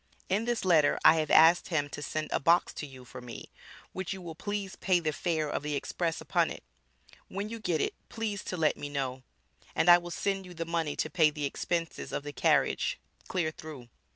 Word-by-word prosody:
In 205 +4 +1
this 240 -4 -1
letter 160 -5 +4
I 165 - +8
have 155 -1 0
asked 165 +2 +6
him 150 -4 0
to 150 - -7
send 155 +1 -3
a - - +1
box 170 +5 +3
to 150 - -6
you 130 -2 -13
for 125 - -10
me, 120 -1 -9 0.4
which 190 0 -3
you 190 - -8
will 165 -2 -6
please 200 +2 -4
pay 185 -2 +2
the 155 -2 -1
fare 160 -1 -1
of 145 - -2
the 150 0 -2
express 165 +3 -2
upon - - +1
it, - - -8 0.6
when 200 +2 -4
you 230 0 -6
get 170 -8 0
it - - 0 0.2
please 215 -4 -3
to 180 - -4
let 155 -2 +2
me 145 - -5
know, 135 -2 -3 0.5
and 165 +2 +3
I 175 - +9
will 175 0 -8
send 195 +1 -2
you 180 - -11
the 165 0 -3
money 165 -3 -1
to - - -1
pay 160 -4 +5
the 150 -1 -4
expenses 165 +3 -3
of - - -3
the 145 0 -6
carriage - - +2 0.3
clear 170 -4 -1
through. 150 -6 -10
165 Hz, 220 wpm, -30 LUFS, 150-185 Hz, 0.6 s, I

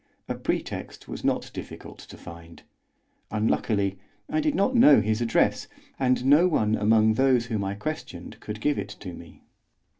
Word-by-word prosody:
A - - -2
pretext - - -4
was - - -7
not - - -1
difficult - - -9
to - - -12
find; 85 0 -12 0.7
unluckily 105 -2 0 0.3
I 310 - +1
did 305 -1 0
not 200 +7 +1
know 150 - +7
his 110 +2 -1
address, 115 -1 +1 0.3
and 130 -1 +1
no 150 +6 +6
one 110 -11 +1
among 110 +1 +3
those 130 0 +2
whom 110 -3 -2
I 100 +1 -3
questioned 105 - -7
could 105 0 -7
give 145 +3 +1
it 105 - -5
to 90 -3 -8
me. 85 0 -13
110 Hz, 160 wpm, -26 LUFS, 100-135 Hz, 0.7 s, know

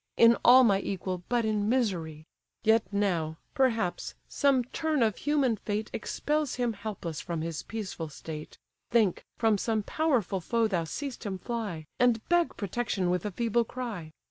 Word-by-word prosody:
In 230 0 +7
all 255 +2 +9
my 200 -5 +4
equal, 185 -2 -3
but 240 -2 +2
in 210 -1 0
misery! 170 -11 -1 0.4
Yet 220 0 +3
now, 175 -6 0 0.2
perhaps, 230 -9 0
some 275 -3 +2
turn 305 +2 0
of 215 -2 +2
human 280 -6 +1
fate 210 +2 -3
Expels 300 +5 -1
him 245 -2 0
helpless 195 -7 -5
from 165 +1 -3
his 165 -2 -3
peaceful 190 -7 -5
state; 150 +1 -8 0.3
Think, 220 -6 +2
from 220 -3 +3
some 220 -1 0
powerful 240 - 0
foe 230 +6 +1
thou 175 -6 0
seest 275 - -5
him 195 -4 -3
fly, 200 -7 -4
And 240 -3 +3
beg 345 -1 +2
protection 200 -3 -1
with 180 +2 0
a - - -4
feeble 235 +3 +1
cry. 220 -10 -6
220 Hz, 160 wpm, -29 LUFS, 180-240 Hz, 0.4 s, all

